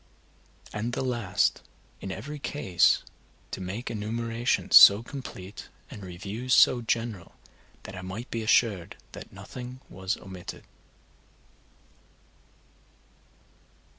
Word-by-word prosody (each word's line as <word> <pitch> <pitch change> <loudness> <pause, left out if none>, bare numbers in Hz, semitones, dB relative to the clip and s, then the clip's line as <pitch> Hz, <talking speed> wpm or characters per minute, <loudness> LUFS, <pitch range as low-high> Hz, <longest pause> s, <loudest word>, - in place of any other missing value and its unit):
And 115 +3 -3
the 130 - -1
last, 120 -7 0 0.4
in 95 - -6
every 145 +10 -6
case 95 -12 +2 0.5
to - - -5
make 100 +7 -5
enumerations 115 +2 -1
so 100 +3 +10
complete, 115 -8 -9 0.2
and 105 - -9
reviews 100 +7 -2
so 125 -2 +6
general, 115 -5 -2 0.5
that 95 - -9
I 95 - -6
might 95 +7 -7
be 115 - -2
assured 110 -5 +2 0.2
that - - -10
nothing 125 +1 -9
was 95 +2 -3
omitted. 95 -2 -9
110 Hz, 105 wpm, -27 LUFS, 95-120 Hz, 0.5 s, so